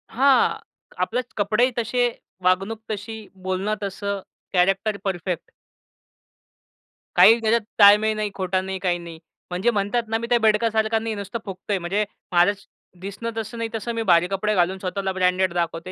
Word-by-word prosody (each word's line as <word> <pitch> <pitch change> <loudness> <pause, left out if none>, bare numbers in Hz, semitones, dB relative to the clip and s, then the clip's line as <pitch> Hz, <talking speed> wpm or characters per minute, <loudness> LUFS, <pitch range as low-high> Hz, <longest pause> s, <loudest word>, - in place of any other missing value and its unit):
हां. 265 0 +4 0.4
आपले 245 +6 -1 0.2
कपडेही 215 +5 +2
तसे, 240 +1 +1 0.4
वागणूक 195 +5 +1
तशी, 220 +2 -5 0.2
बोलणं 190 +3 -1
तसं, 200 0 -3 0.3
कॅरेक्टर 195 +3 +2
परफेक्ट. 180 -2 -3 1.6
काही 230 +2 +7
त्याच्यात 230 +1 +2 0.2
ताळमेळ 210 +1 +7
नाही, 215 -1 -2
खोटा 185 -1 -1
नाही 190 0 -5
काही 180 -2 0
नाही. 170 -2 -10 0.3
म्हणजे 185 +7 +1
म्हणतात 210 +3 0
ना 225 +1 0
मी 235 +1 -5
त्या 240 - +5
बेडकासारखा 220 0 +2
नाही. 225 0 -3
नुसतं 200 +3 -5
फुगतोय 195 +1 -3
म्हणजे 190 +4 -1 0.3
माझं 175 +2 +5 0.5
दिसणं 200 +4 -5
तसं 225 +1 -5
नाही. 230 0 -3
तसं 230 +2 -3
मी 225 - -1
भारी 170 +1 +5
कपडे 205 +2 -1
घालून 185 +1 +2
स्वतःला 190 +1 -2
ब्रँडेड 185 0 +1
दाखवतो. 170 +1 -2
200 Hz, 150 wpm, -23 LUFS, 185-225 Hz, 1.6 s, काही